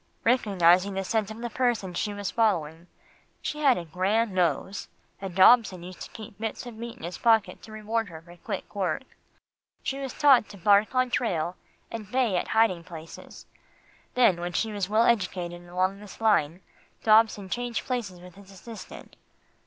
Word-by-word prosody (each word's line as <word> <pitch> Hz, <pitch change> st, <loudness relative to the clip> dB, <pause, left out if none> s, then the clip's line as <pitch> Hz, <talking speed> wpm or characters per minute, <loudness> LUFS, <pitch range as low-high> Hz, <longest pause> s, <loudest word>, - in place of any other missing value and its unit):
"Recognising 195 Hz, -5 st, +3 dB
the 195 Hz, -, -1 dB
scent 215 Hz, +1 st, -1 dB
of 220 Hz, -, -8 dB
the 240 Hz, -, -3 dB
person 230 Hz, -6 st, 0 dB
she 210 Hz, +4 st, -2 dB
was 205 Hz, -1 st, -4 dB
following 170 Hz, -7 st, 0 dB, 0.5 s
she 300 Hz, -, -4 dB
had 275 Hz, -5 st, +4 dB
a 175 Hz, -, -5 dB
grand 195 Hz, +7 st, 0 dB
nose, 180 Hz, +2 st, 0 dB, 0.3 s
and 190 Hz, -3 st, -6 dB
Dobson 190 Hz, -2 st, +5 dB
used 180 Hz, 0 st, -10 dB
to -, -, -7 dB
keep 215 Hz, -2 st, -11 dB
bits 225 Hz, +2 st, -4 dB
of 240 Hz, -, -8 dB
meat 230 Hz, +1 st, -7 dB
in -, -, -14 dB
his 175 Hz, +2 st, -6 dB
pocket 220 Hz, -5 st, +2 dB
to 220 Hz, -, -13 dB
reward 215 Hz, 0 st, -2 dB
her 160 Hz, -1 st, -9 dB
for 170 Hz, +2 st, -15 dB
quick 195 Hz, +1 st, -6 dB
work. 190 Hz, -1 st, -1 dB, 0.8 s
She 275 Hz, -, -3 dB
was 270 Hz, -2 st, -4 dB
taught 275 Hz, -7 st, +4 dB
to 200 Hz, -, -11 dB
bark 205 Hz, +5 st, +3 dB
on 255 Hz, -1 st, +2 dB
trail, 180 Hz, -9 st, -1 dB, 0.4 s
and 215 Hz, -3 st, -7 dB
bay 250 Hz, -6 st, +1 dB
at 180 Hz, -, -1 dB
hiding 220 Hz, -6 st, +2 dB
places. 165 Hz, -1 st, -11 dB, 0.7 s
Then 200 Hz, -9 st, +4 dB
when 175 Hz, 0 st, -4 dB
she 220 Hz, +5 st, 0 dB
was 200 Hz, -2 st, -3 dB
well 215 Hz, +2 st, +4 dB
educated 180 Hz, -5 st, -1 dB
along 185 Hz, +2 st, -1 dB
this 210 Hz, -1 st, -12 dB
line, 190 Hz, -6 st, +2 dB, 0.4 s
Dobson 215 Hz, -2 st, +4 dB
changed 240 Hz, +3 st, -3 dB
places 225 Hz, -8 st, -3 dB
with 180 Hz, 0 st, -13 dB
his 195 Hz, +1 st, -16 dB
assistant." 215 Hz, +4 st, -11 dB
205 Hz, 175 wpm, -27 LUFS, 180-230 Hz, 0.8 s, Dobson